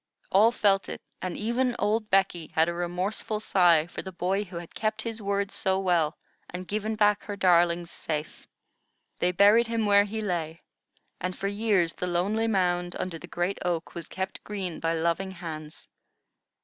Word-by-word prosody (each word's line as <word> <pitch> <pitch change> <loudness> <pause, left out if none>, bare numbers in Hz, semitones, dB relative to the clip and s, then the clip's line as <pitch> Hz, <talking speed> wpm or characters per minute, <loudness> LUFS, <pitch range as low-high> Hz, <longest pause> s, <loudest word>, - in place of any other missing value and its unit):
All 215 +4 +6
felt 195 -4 +2
it, - - -5 0.2
and 185 -1 -3
even 240 +3 0
old 215 +1 0
Becky 190 -4 +2
had 160 +1 +4
a 170 - -1
remorseful 180 +5 -2
sigh 175 -6 +4
for 175 - -7
the 190 - -8
boy 190 +3 -1
who 185 -3 -12
had 170 -1 -8
kept 215 0 -2
his 225 -1 -5
word 200 0 -1
so 190 0 0
well 175 -5 +1 0.3
and 180 +1 -7
given 215 +3 -2
back 210 -1 +3
her 205 - -4
darlings 175 -2 +3
safe. 155 -1 -5 0.7
They 180 - +2
buried 205 +6 +5
him 230 -1 0
where 205 0 +5
he 215 +1 -4
lay; 165 -4 -3 0.6
and 180 +1 -3
for 195 - -2
years 200 -5 +1
the 180 - -4
lonely 200 +6 0
mound 175 -4 +1
under 175 -3 -4
the - - -10
great 175 +3 -2
oak 170 -2 -2
was 170 -2 -7
kept 190 0 -5
green 190 -5 -4
by 165 0 0
loving 170 +4 0
hands. 160 -4 -8
190 Hz, 175 wpm, -27 LUFS, 175-205 Hz, 0.7 s, All